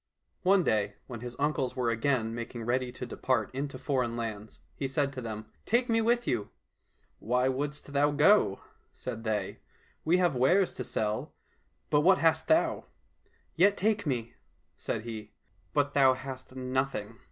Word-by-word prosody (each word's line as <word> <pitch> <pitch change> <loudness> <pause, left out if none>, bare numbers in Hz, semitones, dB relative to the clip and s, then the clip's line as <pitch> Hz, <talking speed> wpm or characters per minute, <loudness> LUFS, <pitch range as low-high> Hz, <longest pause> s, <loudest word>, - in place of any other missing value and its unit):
One 190 0 +4
day, 105 -5 +1
when 120 -3 -7
his 120 +1 -7
uncles 140 -3 0
were 125 -2 +1
again 115 -1 0
making 120 0 -5
ready 125 +2 0
to - - -6
depart 130 -4 -1
into 140 0 -4
foreign 125 -4 -1
lands, 110 -2 -5
he 135 - -3
said 140 +1 0
to 130 - -5
them, 110 -2 -5
" - - -37
Take 240 +2 +2
me 225 0 +3
with 235 +2 +2
you! 110 -4 -1 0.2
" - - -50
— - - -44
" - - -42
Why 125 +3 +1
shouldst 145 +2 -3
thou 145 +1 +4
go? 150 - +4
" - - -37
said 115 - -6
they; 105 -4 -2 0.2
" - - -35
we 170 +3 +3
have 175 -5 +2
wares 175 +10 +3
to 125 - -5
sell, 105 -2 -2 0.6
but 145 - +5
what 190 +4 +6
hast 160 -1 +2
thou? 320 - +2 0.2
"— - - -40
" - - -39
Yet 200 +4 +4
take 210 -3 +1
me," 120 -4 -2 0.4
said 110 - -3
he.—" 110 -2 -7 0.4
But 145 -1 +1
thou 135 -2 +5
hast 130 -1 -8
nothing." 130 -4 -2
130 Hz, 185 wpm, -30 LUFS, 115-150 Hz, 0.6 s, what